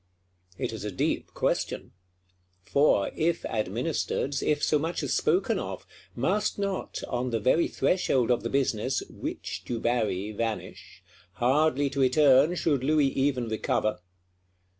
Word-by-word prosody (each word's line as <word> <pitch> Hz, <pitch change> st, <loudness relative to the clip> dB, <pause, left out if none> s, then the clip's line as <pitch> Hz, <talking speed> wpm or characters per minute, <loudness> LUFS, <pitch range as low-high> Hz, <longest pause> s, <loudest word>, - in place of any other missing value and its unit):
It -, -, -3 dB
is 110 Hz, -, -6 dB
a 105 Hz, -, -3 dB
deep 90 Hz, -, -2 dB
question. -, -, -1 dB, 0.7 s
For, 140 Hz, -4 st, +2 dB
if 165 Hz, +1 st, 0 dB
administered, 120 Hz, -, -2 dB
if 150 Hz, -1 st, 0 dB
so 150 Hz, -, +3 dB
much 165 Hz, +4 st, -2 dB
as -, -, -1 dB
spoken -, -, +1 dB
of, -, -, -6 dB, 0.3 s
must 190 Hz, -, 0 dB
not, 200 Hz, -2 st, -3 dB
on 125 Hz, 0 st, -2 dB
the 115 Hz, -2 st, -1 dB
very 130 Hz, +10 st, +3 dB
threshold 130 Hz, -9 st, +1 dB
of 120 Hz, -, +2 dB
the 115 Hz, -, -3 dB
business, 130 Hz, -1 st, 0 dB
Witch -, -, -5 dB
Dubarry 110 Hz, -4 st, -1 dB
vanish; 110 Hz, 0 st, -5 dB, 0.3 s
hardly 140 Hz, +5 st, +2 dB
to 140 Hz, -, -3 dB
return 135 Hz, +4 st, +5 dB
should 145 Hz, -7 st, 0 dB
Louis 150 Hz, 0 st, +3 dB
even 135 Hz, -3 st, 0 dB
recover? 110 Hz, -1 st, -1 dB
130 Hz, 135 wpm, -27 LUFS, 115-150 Hz, 0.7 s, return